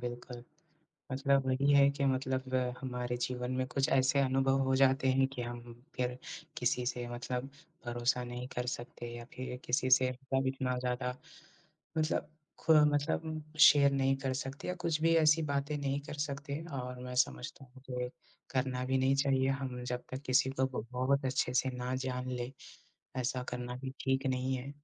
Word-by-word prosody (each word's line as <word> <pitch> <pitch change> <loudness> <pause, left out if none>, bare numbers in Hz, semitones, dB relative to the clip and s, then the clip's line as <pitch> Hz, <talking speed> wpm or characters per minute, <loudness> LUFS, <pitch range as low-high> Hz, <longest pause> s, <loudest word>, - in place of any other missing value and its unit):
बिल्कुल। 120 0 -6 0.7
मतलब 135 0 +2
वही 135 +2 +3
है 140 0 +7
कि 140 0 -2
मतलब 130 0 -1 0.3
हमारे 125 -2 -3
जीवन 125 0 -2
में 130 0 0
कुछ 135 +1 0
ऐसे 130 +1 +4
अनुभव 135 0 +3
हो 130 0 +2
जाते 135 0 +4
हैं 135 +1 +4
कि, 135 -2 -6
हम 120 0 -8
फिर 125 0 -1 0.4
किसी 125 0 +1
से 120 -1 -2
मतलब 125 +2 -4 0.4
भरोसा 120 +1 +1
नहीं 125 +1 -5
कर 125 0 -1
सकते 120 -1 -5
या 120 0 -7
फिर 130 -1 -5
किसी 130 +1 +1
से 130 0 +6
मतलब 135 +1 -2
इतना 130 -1 -1
ज़्यादा 125 0 -2 0.8
मतलब 155 -1 0 0.3
ख़ु 160 - +4 0.2
मतलब 155 +1 -1 0.2
शेयर 145 -3 +8
नहीं 135 0 +2
कर 135 -1 -2
सकते 135 +1 -5
या 180 - 0
कुछ 165 -3 0
भी 165 +1 +4
ऐसी 160 0 +5
बातें 140 +1 -1
नहीं 140 0 -1
कर 145 - -8
सकते 140 +1 -5 0.2
और 125 0 -6
मैं 125 0 -6
समझता 65 - -1
हूँ 130 +1 -17
कि, 125 -1 -2 0.4
करना 130 -1 -1
भी 130 0 +1
नहीं 130 +1 +3
चाहिए 135 -1 +2
हम 130 -2 -3
जब 125 0 -3
तक 130 +2 -4
किसी 130 +1 +3
को 130 - +5 0.3
बहुत 130 +2 +1
अच्छे 130 -1 0
से 130 +1 +2
ना 125 +1 -2
जान 125 0 -3
लें, 125 0 -3 0.7
ऐसा 125 0 -1
करना 125 0 -4
भी 130 -1 -4
ठीक 135 0 +1
नहीं 130 0 0
है। 130 +2 -5
130 Hz, 175 wpm, -33 LUFS, 125-135 Hz, 0.8 s, शेयर